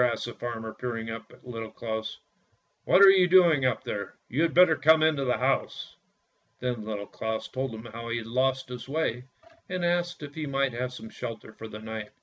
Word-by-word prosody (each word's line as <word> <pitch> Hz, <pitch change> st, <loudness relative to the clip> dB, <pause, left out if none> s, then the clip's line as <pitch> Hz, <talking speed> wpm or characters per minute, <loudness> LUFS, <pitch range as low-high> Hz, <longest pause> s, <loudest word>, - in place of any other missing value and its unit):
asked 120 Hz, -1 st, 0 dB
the 120 Hz, -, -6 dB
farmer, 115 Hz, -2 st, -5 dB
peering 115 Hz, -2 st, -4 dB
up 115 Hz, -1 st, -8 dB
at -, -, -18 dB
Little 115 Hz, -2 st, -5 dB
Claus. 110 Hz, -1 st, -4 dB, 0.7 s
"What 195 Hz, -, +6 dB
are 195 Hz, -, +11 dB
you 185 Hz, -2 st, +5 dB
doing 170 Hz, -6 st, +6 dB
up 125 Hz, -3 st, +1 dB
there? 100 Hz, -1 st, -5 dB
You 135 Hz, +6 st, 0 dB
had 165 Hz, -1 st, +3 dB
better 180 Hz, -2 st, +6 dB
come 155 Hz, +2 st, +5 dB
into 150 Hz, -3 st, +2 dB
the 125 Hz, -, +1 dB
house." 135 Hz, +2 st, -1 dB, 0.6 s
Then 120 Hz, -3 st, -2 dB
Little 105 Hz, -2 st, -4 dB
Claus 110 Hz, +2 st, -4 dB
told 130 Hz, +1 st, -3 dB
him 110 Hz, +1 st, -9 dB
how 115 Hz, +1 st, -7 dB
he 120 Hz, -, -1 dB
had 115 Hz, -, -5 dB
lost 130 Hz, +3 st, 0 dB
his 125 Hz, +1 st, -7 dB
way, 130 Hz, -5 st, -1 dB, 0.4 s
and 180 Hz, -1 st, -1 dB
asked 175 Hz, -1 st, 0 dB
if 145 Hz, -1 st, -8 dB
he 155 Hz, -1 st, -4 dB
might 135 Hz, -2 st, 0 dB
have 125 Hz, +1 st, -3 dB, 0.2 s
shelter 115 Hz, -3 st, -7 dB
for 110 Hz, -, -9 dB
the 105 Hz, -, -8 dB
night. 110 Hz, -1 st, -6 dB
125 Hz, 205 wpm, -28 LUFS, 115-150 Hz, 0.7 s, are